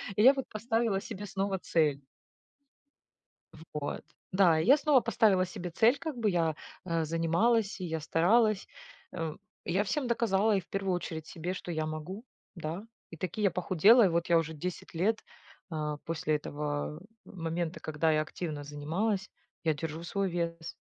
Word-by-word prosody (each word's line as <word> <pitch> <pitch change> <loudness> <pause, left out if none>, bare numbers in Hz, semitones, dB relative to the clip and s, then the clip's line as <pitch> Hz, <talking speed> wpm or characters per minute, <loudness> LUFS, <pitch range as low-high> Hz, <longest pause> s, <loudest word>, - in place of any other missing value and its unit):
И 210 - +2
я 265 - +9
вот 270 -2 -3
поставила 225 -2 0
себе 205 -1 -7
снова 195 -1 -2
цель. 150 -6 +1 1.7
Вот, 150 -1 -3 0.3
да 175 -4 +5
и - - 0
я 270 +5 +8
снова 295 -3 +4
поставила 215 -5 +3
себе 180 0 -6
цель, 230 +10 +4
как 310 -1 -5
бы 220 -3 +2
я, 165 -3 +1 0.3
э, 165 -2 0
занималась, 170 +8 +1
и 185 - -3
я 160 -1 -2
старалась, 205 +7 +3 0.5
м, 165 -3 -4 0.3
я 190 +4 +1
всем 270 +6 -1
доказала 220 -3 +2
и 195 - +1
в - - -20
первую 195 -1 -1
очередь 160 -3 -4
себе, 175 +2 -4
что 180 - -7
я 155 -1 -1
могу, 155 +9 -6 0.3
да. 170 +3 -5 0.3
И 165 - -9
таки 185 +6 -4
я 200 - +4
похудела, 185 +6 +5
и - - +5
вот 170 0 0
я 170 - +5
уже 160 -1 -2
10 175 +4 -6
лет, 215 +7 +1 0.5
э, 150 -2 -2
после 155 -2 0
этого 150 +1 -4 0.2
момента, 165 -2 -4
когда 155 +1 +1
я 155 - +3
активно 155 -2 -5
занималась, 175 +8 -2 0.3
я 160 -2 +3
держу 160 +2 -5
свой 195 +2 -1
вес, 170 -1 -3
175 Hz, 165 wpm, -30 LUFS, 160-205 Hz, 1.7 s, я